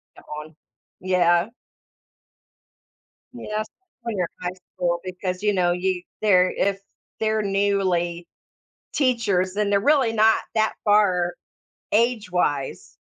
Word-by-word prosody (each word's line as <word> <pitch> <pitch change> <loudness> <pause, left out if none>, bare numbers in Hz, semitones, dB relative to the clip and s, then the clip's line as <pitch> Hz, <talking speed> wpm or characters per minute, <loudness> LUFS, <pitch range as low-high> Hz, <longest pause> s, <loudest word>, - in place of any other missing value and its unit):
yeah, - - -15 0.2
on 155 0 -11 0.5
yeah. 175 0 +3 1.8
Yeah, 215 -3 -4
s 215 - -4 0.4
when 230 -2 -3
you're 180 -3 0
in - - -4
high 180 - -6 0.2
school, 175 -1 0
because, 185 0 -4
you 210 0 +2
know, 180 -3 +2
you 180 0 -1 0.2
they're 185 -4 +4
if 195 0 0 0.4
they're 220 0 +1
newly 190 -4 0 0.7
teachers, 215 -9 +1
then 205 0 0
they're 200 -1 +3
really 265 -1 +3
not 220 0 +5 0.2
that 220 0 +2
far 185 -4 +3 0.6
age 225 -2 +1
wise 145 - -1
195 Hz, 125 wpm, -23 LUFS, 180-215 Hz, 1.8 s, not